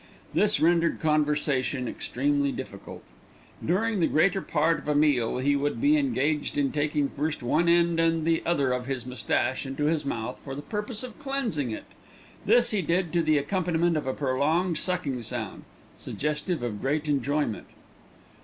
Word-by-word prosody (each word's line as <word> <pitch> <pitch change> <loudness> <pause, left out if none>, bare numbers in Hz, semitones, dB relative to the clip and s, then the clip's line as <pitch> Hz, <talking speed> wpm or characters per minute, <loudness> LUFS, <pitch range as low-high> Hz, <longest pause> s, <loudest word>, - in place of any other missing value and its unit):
This 210 0 +3
rendered 170 +1 +3
conversation 145 -4 +1
extremely 140 +3 0
difficult. - - -8 0.6
During 210 +5 +1
the 165 - +3
greater 190 +5 +2
part 160 -1 +1
of 150 - -12
a 150 - +1
meal 145 -7 +2
he 140 +3 +2
would 145 +1 -1
be 290 +2 +4
engaged 155 - 0
in 140 -2 +1
taking 145 -1 0
first 150 0 -3
one 165 +8 +2
end 170 -1 +3
and 165 0 +3
then 160 - -3
the 165 0 +2
other 140 -6 +1
of 125 0 -2
his 130 -3 -3
moustache 125 +1 -1
into 135 +1 -4
his 155 0 +1
mouth 125 -2 -4
for 135 -1 -6
the 145 - -7
purpose 210 - -2
of 250 -3 -9
cleansing 265 - -1
it. 110 - -6 0.6
This 240 +3 +5
he 210 -3 +1
did 170 +1 0
to 170 - +3
the 155 -2 +3
accompaniment 170 +2 0
of 150 -3 -2
a 130 - 0
prolonged 150 +6 0
sucking 165 -9 -2
sound, 115 -3 -5 0.3
suggestive 150 +1 -3
of 105 -4 -4
great 150 +3 -1
enjoyment. 145 -4 -1
150 Hz, 170 wpm, -27 LUFS, 140-170 Hz, 0.6 s, This